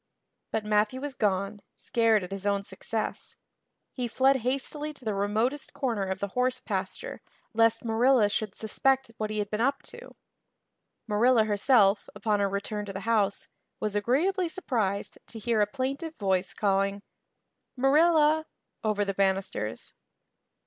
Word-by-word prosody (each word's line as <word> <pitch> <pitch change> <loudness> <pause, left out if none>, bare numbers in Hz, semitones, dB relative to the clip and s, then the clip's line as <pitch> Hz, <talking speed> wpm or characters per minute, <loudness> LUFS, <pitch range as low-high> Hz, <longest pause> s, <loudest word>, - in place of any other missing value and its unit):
But 220 -1 -2
Matthew 210 +4 +1
was 285 0 -4
gone, 200 -2 -1
scared 225 -4 +2
at 180 - -8
his 195 +1 -4
own 200 -1 +1
success. 215 +3 -4 0.6
He 250 -2 -2
fled 265 +3 +3
hastily 275 +5 -2
to 260 - -13
the 215 - 0
remotest 220 +8 -1
corner 235 -8 -1
of 190 0 -2
the 200 +1 -3
horse 250 +4 0
pasture - - -4 0.3
lest 225 +1 +3
Marilla 230 0 +4
should 210 -1 -2
suspect 265 +3 +1
what 215 -1 -2
he 215 - -3
had 205 -1 -2
been 210 +1 -1
up 275 +3 +1
to. - - -10 0.9
Marilla 230 +2 +4
herself, 210 -1 +3
upon 210 -3 0
her 200 -1 +2
return 205 +1 -3
to 200 - -7
the 195 - -5
house, 210 -2 +1 0.3
was 210 -1 -2
agreeably 330 - +1
surprised 215 - -2
to 230 - -10
hear 225 0 +1
a 205 - +3
plaintive 275 +7 -3
voice 190 -2 0
calling, 200 0 +1 0.7
"Marilla" 310 +3 +4 0.4
over 210 -2 +1
the 195 - -2
banisters. 190 - -1
220 Hz, 150 wpm, -28 LUFS, 200-260 Hz, 0.9 s, Marilla